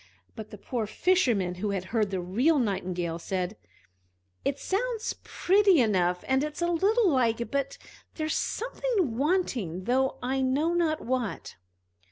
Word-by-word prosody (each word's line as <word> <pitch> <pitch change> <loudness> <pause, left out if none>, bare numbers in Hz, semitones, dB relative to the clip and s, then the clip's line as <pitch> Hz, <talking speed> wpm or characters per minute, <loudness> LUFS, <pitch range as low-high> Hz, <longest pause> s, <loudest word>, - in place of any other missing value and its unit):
But 220 -1 -8
the 210 - -10
poor 225 +1 -3
Fisherman, 230 - +2
who 210 - 0
had 195 -2 -2
heard 215 -3 +2
the 190 -1 -2
real 235 - +2
Nightingale, 180 -7 -1
said: 185 +3 -3 0.9
"It 280 - 0
sounds 450 +7 -2
pretty 390 -2 +3
enough, 180 -6 +2
and 265 +1 +2
it's 300 +3 -3
a 345 - +1
little 410 +6 +3
like, 235 -3 +1
but 275 0 -1 0.4
there's 310 -1 -1
something 445 - -1
wanting, 250 - 0
though 260 +5 +1
I 265 +2 0
know 280 +6 +1
not 330 -3 +1
what!" 250 -4 -3
260 Hz, 145 wpm, -28 LUFS, 205-335 Hz, 0.9 s, pretty